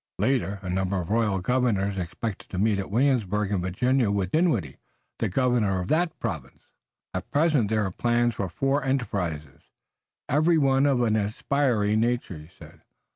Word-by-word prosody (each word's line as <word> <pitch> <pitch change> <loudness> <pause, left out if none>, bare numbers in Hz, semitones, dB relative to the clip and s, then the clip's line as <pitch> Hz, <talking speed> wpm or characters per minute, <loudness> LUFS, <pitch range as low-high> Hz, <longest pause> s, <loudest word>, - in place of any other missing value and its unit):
Later, 105 -2 0
a 90 - -5
number 95 +1 -1
of 85 - -5
the - - 0
royal 110 -4 +1
governors 105 -4 +1
expected 95 +3 -5
to 95 - -5
meet 105 +1 +2
at 95 - -4
Williamsburg 105 -4 +1
in 100 -3 0
Virginia 120 +7 +1
with 100 -2 -1
Dinwiddie, 135 - +1 0.4
the 110 - 0
governor 115 -4 +1
of 90 - -4
that 165 +1 +1
province. - - -5 0.5
"At - - -5
present 145 -8 +2
there 110 -2 +1
are 95 - -3
plans 120 +3 +1
for 95 -3 -3
four 135 - 0
enterprises, 90 - -3 0.7
every 155 +4 +3
one 135 -1 +3
of 130 -3 +2
an 110 -2 +2
aspiring 110 0 +1
nature," 115 -7 -1
he 75 +1 -13
said. - - -14
110 Hz, 170 wpm, -26 LUFS, 95-130 Hz, 0.7 s, every